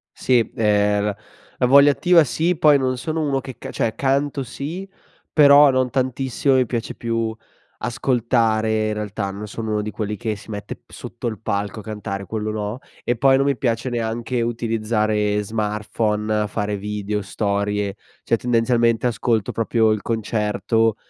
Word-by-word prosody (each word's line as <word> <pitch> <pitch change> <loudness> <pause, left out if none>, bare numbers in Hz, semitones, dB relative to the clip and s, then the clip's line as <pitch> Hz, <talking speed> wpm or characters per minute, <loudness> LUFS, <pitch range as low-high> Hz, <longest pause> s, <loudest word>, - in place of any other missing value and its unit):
Sì, 125 -3 +2
ehm, 105 -1 +2
la 105 -1 -1 0.4
la - - +2
voglia 140 +2 +7
attiva 175 +3 +4
sì, 165 +7 0
poi 150 -3 +6
non 130 -1 -1
sono 160 +5 -2
uno 140 -3 0
che 130 -3 -9
ca - - -8
cioè 110 - -1
canto 140 0 0
sì, 155 +10 -6 0.4
però 145 -1 +7
non 130 -1 +1
tantissimo; 130 +1 0
mi 130 -1 +3
piace 115 -1 -3
più 115 -1 -2 0.4
ascoltare 115 -3 +1
in 105 - -1
realtà, 105 -1 -3
non 105 +2 -7
sono 110 +1 -5
uno 105 0 0
di 105 - -4
quelli 105 -1 -3
che 110 0 -2
si 105 - -14
mette 105 -1 -7
sotto 120 +1 -7
il 110 -2 -4
palco 105 -1 -3
a - - -9
cantare, 100 -2 -5
quello 110 0 -3
no; 105 +2 -4 0.2
e 120 - 0
poi 135 +2 +5
non 135 - +2
mi 140 -2 +1
piace 120 0 -1
neanche 120 +1 -2
utilizzare 110 -2 0
smartphone, 105 0 -1
fare 105 0 -2
video, 105 +1 -3
storie. 100 0 -1 0.3
Cioè, - - +2
tendenzialmente 115 0 +2
ascolto 115 -2 0
proprio 115 0 +1
il 110 -1 0
concerto 110 0 0
115 Hz, 160 wpm, -21 LUFS, 105-130 Hz, 0.4 s, voglia